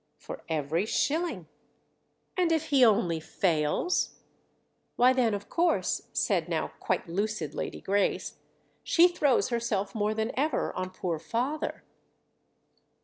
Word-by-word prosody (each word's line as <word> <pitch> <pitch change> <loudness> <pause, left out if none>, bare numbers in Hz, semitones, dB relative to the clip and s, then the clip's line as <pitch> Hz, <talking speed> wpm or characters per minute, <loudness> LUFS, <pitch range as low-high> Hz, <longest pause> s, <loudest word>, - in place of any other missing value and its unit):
"For - - -8
every 160 +5 -1
shilling." 290 - 0 0.9
"And 360 -2 +2
if 320 -1 0
he 275 -3 +5
only 200 -8 +3
fails?" 160 - 0 0.8
"Why 250 +1 +5
then 240 -5 +2
of 205 - -7
course," 345 0 0
said - - 0
now - - -1
quite - - -1
lucid 185 -3 -2
Lady - - -5
Grace, 200 +1 0 0.4
"she 345 +1 +5
throws 295 -8 +2
herself 225 -5 -1
more 215 0 0
than 220 +1 -1
ever 295 +4 0
on 185 0 -3
poor 180 -3 -3
father." 245 - -3
220 Hz, 125 wpm, -28 LUFS, 185-285 Hz, 0.9 s, he